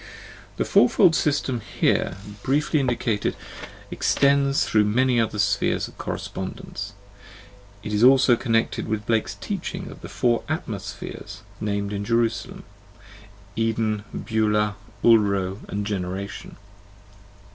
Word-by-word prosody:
The - - 0
fourfold 160 +7 +5
system 140 -5 0
here 100 -3 0 0.2
briefly 145 +4 +1
indicated 120 -5 0 0.6
extends 140 0 +2
through 105 -1 +3
many 125 +3 +2
other 110 -1 -2
spheres 100 0 +1
of - - -16
correspondence; - - -5 0.9
it 105 - -4
is 105 +2 +2
also 130 -1 +7
connected 115 -1 0
with 110 -1 -2
Blake's 115 -1 0
teaching - - -5
of - - -12
the - - -8
four 120 -1 +1
" - - -14
atmospheres," - - -5 0.2
named 100 -1 -2
in 100 0 -3
"Jerusalem," 115 0 -1 0.9
Eden, 110 -2 0
Beulah, 105 -2 0 0.3
Ulro, 100 -4 +3
and 100 0 -3
Generation. 100 0 -4
110 Hz, 115 wpm, -24 LUFS, 105-125 Hz, 0.9 s, also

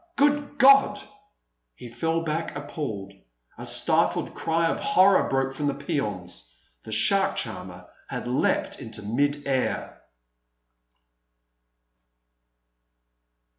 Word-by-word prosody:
Good 290 0 +1
God!" 275 0 +6 0.8
He 125 - -10
fell 160 +8 -1
back 160 -1 -3
appalled. 140 -9 -5 0.4
A - - -6
stifled - - +2
cry 165 +1 0
of 165 - 0
horror 200 -8 +4
broke 135 0 0
from 145 +2 -2
the 140 - -1
peons. 105 -11 -4 0.3
The - - -9
shark 195 - +2
charmer 90 -4 -5 0.2
had - - -5
leapt - - 0
into 105 - -6
mid 145 +7 -1
air. 130 -2 -2
145 Hz, 100 wpm, -25 LUFS, 110-165 Hz, 0.8 s, God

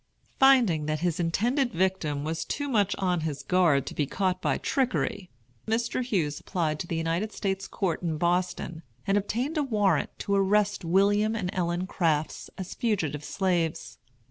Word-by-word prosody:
Finding 235 - +5
that 155 0 -1
his 175 -2 0
intended 240 - +1
victim 170 -6 0
was 160 +1 -2
too 285 0 -3
much 205 -7 +2
on 180 -2 0
his 150 -3 -4
guard 160 -5 +3
to - - -6
be 145 - -1
caught 185 +2 -1
by - - +1
trickery, 250 -8 -1 0.4
Mr. 235 +3 0
Hughes 170 - -1
applied 160 -5 -2
to 170 - -4
the 170 - -2
United 165 +6 -1
States 195 -2 -2
Court 185 -5 -2
in 165 -3 -2
Boston 175 -1 -1 0.2
and 195 0 +2
obtained 240 - -1
a - - +2
warrant 210 -7 +1
to 200 - -2
arrest 200 +1 +2
William 205 +5 +3
and 185 -5 -2
Ellen 175 0 -1
Crafts 160 -5 -1
as 190 -1 -6
fugitive 160 - -1
slaves. 175 -2 -1
185 Hz, 165 wpm, -27 LUFS, 165-210 Hz, 0.4 s, Finding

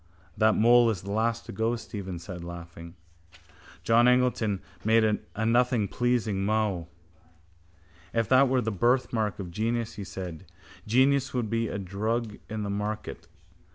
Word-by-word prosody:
—That 110 +1 +3
mole 120 +1 +5
is 95 -6 -3
the 100 - -6
last 115 +2 0
to - - -8
go, 115 +2 0
Stephen 100 -5 -6
said, 85 0 -8
laughing. 85 0 -9 0.9
John 115 +2 +4
Eglinton 125 -6 +2 0.2
made 110 -1 +3 0.2
a 110 - -1
nothing 120 -2 +2
pleasing 115 -4 0
mow. 105 -5 0 1.2
—If 115 -2 0
that 130 +1 +5
were 130 -1 +2
the 110 - -2
birthmark 110 -1 +1
of 90 -4 -6
genius, 115 +4 -1
he 100 - -5
said, 90 -2 -7 0.4
genius 130 +4 +3
would 115 -4 -1
be 115 0 0
a 100 - -4
drug 105 +4 -3
in 110 -1 -3
the 100 - -3
market. 105 -5 -4
110 Hz, 150 wpm, -27 LUFS, 100-120 Hz, 1.2 s, mole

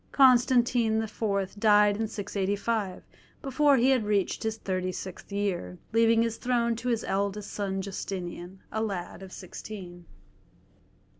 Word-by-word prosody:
Constantine 245 -3 +4
IV. 205 -3 -2
died 210 -1 +5
in 220 +1 -1
685, 205 0 -2 0.4
before 275 +1 +4
he 255 +2 +4
had 255 -4 +3
reached 205 -3 0
his 220 0 -2
thirty 185 -3 -2
sixth 185 +2 -8
year, 190 - -2 0.2
leaving 230 0 +4
his 230 -1 -2
throne 235 -2 +1
to 240 +2 -6
his 230 -2 0
eldest 200 +1 -2
son 195 -2 -2
Justinian, 185 -1 -6
a 220 - -1
lad 195 -4 -4
of 190 -1 -10
sixteen. 180 -2 -9
210 Hz, 135 wpm, -28 LUFS, 190-230 Hz, 0.4 s, died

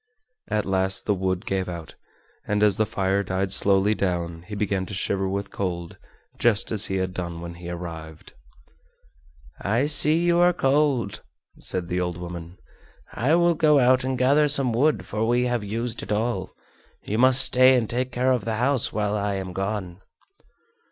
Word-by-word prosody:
At 105 -1 -1
last 95 0 -1
the 105 - +2
wood 95 -1 -2
gave 95 -1 -2
out, 85 -2 -8 0.5
and 105 0 0
as 105 -2 +3
the 110 - +1
fire 95 0 0
died 95 0 -2
slowly 100 +1 +2
down 85 -4 -3
he 105 - -6
began 100 -2 -2
to 100 - -6
shiver 95 -1 -1
with 100 +1 -4
cold 85 -3 -5 0.4
just 115 -3 +2
as 110 -1 +2
he 95 - -3
had 95 -1 -2
done 85 -2 -5
when 85 0 -7
he 85 0 -9
arrived. 80 -2 -8 1.3
"I 115 +7 +1
see 150 +1 +4
you 170 0 +2
are 175 0 +4
cold," 135 - 0 0.4
said 90 -2 -3
the 90 +1 -2
old 90 -1 -3
woman; 85 0 -8 0.6
"I 140 +7 +1
will 170 0 +3
go 155 -2 +3
out 130 -1 +4
and 130 0 -2
gather 140 +4 +3
some 135 -4 +2
wood, 120 -6 +1
for 110 +3 -2
we 120 +1 +2
have 120 -3 -1
used 115 +3 -4
it - - -8
all. 105 -3 -1 0.5
You 110 +2 -3
must 130 +1 +7
stay 130 +1 +5
and 120 -3 0
take 125 +3 -3
care 125 +2 +1
of 125 -3 0
the 115 -1 -2
house 125 +2 +1
while 105 -1 -1
I 100 -1 -1
am 95 -1 -5
gone." 95 -1 -4
105 Hz, 180 wpm, -24 LUFS, 95-125 Hz, 1.3 s, must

